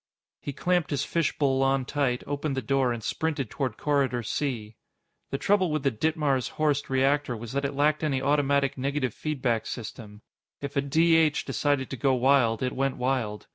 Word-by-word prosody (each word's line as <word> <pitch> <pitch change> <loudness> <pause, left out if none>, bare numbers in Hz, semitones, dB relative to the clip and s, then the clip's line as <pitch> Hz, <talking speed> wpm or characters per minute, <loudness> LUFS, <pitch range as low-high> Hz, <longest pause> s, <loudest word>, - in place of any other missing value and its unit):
He 145 - -5
clamped 175 +4 0
his 140 -1 -1
fishbowl 140 -5 +1
on 135 -1 +2
tight, 130 -3 -1
opened 145 -1 -3
the - - 0
door, 135 +1 +1
and 115 -2 -4
sprinted 150 -5 -2
toward 130 -6 -3
Corridor 135 -5 0
C. 110 -3 -3 0.5
The 135 - -2
trouble 190 +2 +2
with 155 -2 -1
the 140 - +2
Ditmars 145 0 0
Horst 150 -2 +1
reactor 135 -1 +1
was 115 0 -7
that 140 +1 -1
it 140 - -3
lacked 150 +2 +2
any 140 -4 +1
automatic 140 -1 +1
negative 135 -3 -1
feedback 130 -7 -1
system. 110 -2 -8 0.4
If 140 0 -6
a 140 - +3
D 160 +4 +3
H 155 -2 +2
decided 145 -3 0
to 130 - -4
go 135 +1 +2
wild, 125 -3 +3
it 125 - -1
went 135 0 -1
wild. 125 -5 -1
135 Hz, 180 wpm, -27 LUFS, 130-145 Hz, 0.5 s, a